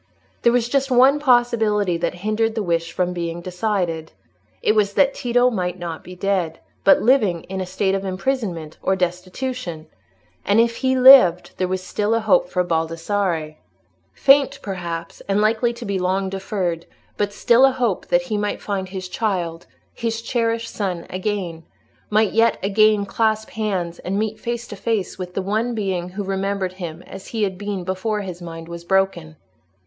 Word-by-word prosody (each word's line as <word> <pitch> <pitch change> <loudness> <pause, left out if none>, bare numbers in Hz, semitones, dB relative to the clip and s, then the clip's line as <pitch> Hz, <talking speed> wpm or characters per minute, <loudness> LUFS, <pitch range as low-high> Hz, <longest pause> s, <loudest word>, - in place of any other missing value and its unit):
There 235 - +4
was 240 -1 +2
just 275 +2 0
one 260 +3 +5
possibility 225 - +2
that 170 +1 -2
hindered 220 +1 +1
the 220 - -1
wish 165 -2 -1
from 180 -1 -1
being 170 -1 -4
decided: 180 -3 -2 0.5
it - - +4
was 205 -2 +2
that 275 -1 +4
Tito 245 +1 +2
might 180 -4 -2
not 170 -3 -6
be 180 - -10
dead, 180 -3 -1 0.3
but 195 - +5
living 215 -10 +3
in 190 0 -5
a 185 - -4
state 190 +1 0
of 195 0 -1
imprisonment 190 - -3
or 190 - +1
destitution; 180 0 -3 0.6
and 205 +2 +3
if 230 0 +2
he 260 -1 +1
lived, 250 -10 +7
there 185 - 0
was 185 0 -3
still 210 +4 0
a - - +2
hope 210 -5 +3
for 180 0 +1
Baldassarre—faint, 170 - 0
perhaps, 170 -4 -5
and 200 +1 +1
likely 225 +3 +2
to 235 0 -8
be 200 -1 -1
long 190 +1 0
deferred, 185 -3 -3 0.3
but 205 0 -1
still 235 +4 +4
a 270 - +7
hope, 240 -7 -1
that 265 0 +2
he 225 -5 -2
might 205 0 -2
find 195 -2 -3
his 185 -1 -6
child, 180 -5 -2 0.3
his 230 0 -3
cherished 230 -1 -1
son 185 -5 -3
again; 185 -3 -3 0.5
might 215 0 +3
yet 230 +1 +3
again 210 +1 +3
clasp 220 +1 0
hands 190 -6 -2
and 195 +2 -3
meet 215 0 -2
face 235 +1 -3
to - - -6
face 220 -5 -2
with 180 -1 -6
the 195 - -1
one 220 +5 -1
being 190 -4 -2
who 200 +3 -5
remembered 195 -1 -2
him 175 -2 -7
as 190 0 -10
he 225 -2 -2
had 190 -2 -1
been 200 -1 -4
before 190 +4 -2
his 180 -3 -7
mind 165 -1 -8
was 170 0 -8
broken. 180 -4 0
195 Hz, 175 wpm, -21 LUFS, 180-225 Hz, 0.6 s, lived